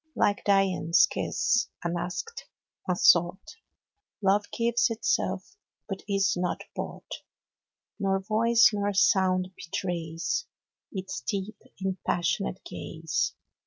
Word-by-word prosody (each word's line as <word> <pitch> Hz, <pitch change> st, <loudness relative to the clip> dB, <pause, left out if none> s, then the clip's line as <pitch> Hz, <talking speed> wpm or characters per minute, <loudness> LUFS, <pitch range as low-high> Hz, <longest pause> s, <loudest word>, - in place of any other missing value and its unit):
Like 205 Hz, 0 st, +1 dB
Dian's 190 Hz, -4 st, +4 dB
kiss, 250 Hz, -6 st, 0 dB, 0.2 s
unasked, 175 Hz, -, -4 dB, 0.4 s
unsought, 175 Hz, -, +3 dB, 0.6 s
Love 205 Hz, +1 st, +2 dB
gives 235 Hz, +1 st, +2 dB
itself, 205 Hz, -, -1 dB, 0.3 s
but 195 Hz, -2 st, -5 dB
is 195 Hz, 0 st, +2 dB
not 180 Hz, 0 st, -2 dB
bought; -, -, -5 dB
15 -, -, -8 dB, 0.7 s
Nor 195 Hz, -1 st, +1 dB
voice, 230 Hz, +3 st, +4 dB
nor 205 Hz, 0 st, 0 dB
sound 185 Hz, -1 st, +3 dB
betrays 170 Hz, -, -3 dB, 0.4 s
Its 190 Hz, -1 st, -5 dB
deep, 200 Hz, +1 st, -4 dB, 0.2 s
impassioned 190 Hz, 0 st, -1 dB
ga/e. 160 Hz, 0 st, -8 dB
195 Hz, 95 wpm, -28 LUFS, 180-210 Hz, 0.7 s, Dian's